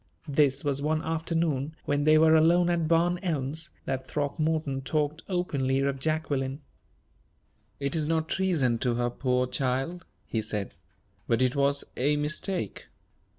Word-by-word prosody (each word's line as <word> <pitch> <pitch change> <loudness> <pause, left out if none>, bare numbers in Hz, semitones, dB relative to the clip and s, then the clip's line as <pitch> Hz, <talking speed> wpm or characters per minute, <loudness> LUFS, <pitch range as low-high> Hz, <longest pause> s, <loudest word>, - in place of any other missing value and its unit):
This 140 -2 +2
was 140 -1 0
one 155 +2 0
afternoon 160 -3 -1
when 145 0 0
they 155 0 +6
were 160 0 +6
alone 170 +2 +5
at 170 -2 +1
Barn 170 +2 +2
Elms, 155 -2 -2 0.2
that 130 0 -3
Throckmorton 150 -1 -1
talked 150 +3 -1
openly 140 -8 0
of 140 -1 0
Jacqueline. 140 -2 -1 1.2
"It 140 +2 -2
is 155 -2 0
not 160 0 0
treason 155 -13 +1
to 120 -1 0
her, 120 0 0
poor 125 0 +1
child," 135 +7 -2 0.2
he 110 - -2
said, 105 -2 -4 0.5
"but 115 +2 +2
it 125 +1 +1
was 140 0 +2
a 145 +4 +2
mistake. 155 - -2
145 Hz, 145 wpm, -28 LUFS, 135-160 Hz, 1.2 s, they